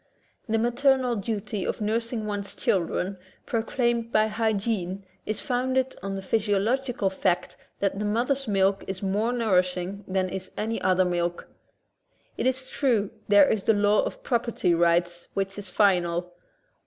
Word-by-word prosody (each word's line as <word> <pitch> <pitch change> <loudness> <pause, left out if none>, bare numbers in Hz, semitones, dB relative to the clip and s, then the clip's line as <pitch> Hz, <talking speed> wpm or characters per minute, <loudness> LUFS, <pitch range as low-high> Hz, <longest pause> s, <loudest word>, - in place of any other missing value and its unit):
The 225 - +2
maternal 250 +2 +2
duty 205 -1 -3
of - - -2
nursing 225 +1 -1
one's 205 -1 -4
children 185 +1 0 0.3
proclaimed 235 0 0
by 215 0 +4
hygiene 210 -3 -1 0.2
is 215 - -1
founded 260 +1 0
on 195 0 -4
the 195 - -5
physiological 220 +2 0
fact 180 -2 0 0.3
that 200 0 0
the 210 - -1
mother's 245 +6 0
milk 195 -1 +2
is 190 +1 -5
more 205 +5 +1
nourishing 185 -4 0
than 185 0 0
is 190 0 -5
any 225 +2 -2
other 185 0 +3
milk. 175 -1 -1 0.9
It - - 0
is 260 0 -1
true 230 -9 +1 0.2
there 205 -2 +7
is 215 -3 0
the 225 - +4
law 205 +1 +4
of - - -5
property 235 -7 +1
rights 175 +1 +1
which 195 0 -1
is 200 -2 -7
final. 180 -3 +2
205 Hz, 145 wpm, -26 LUFS, 190-230 Hz, 0.9 s, there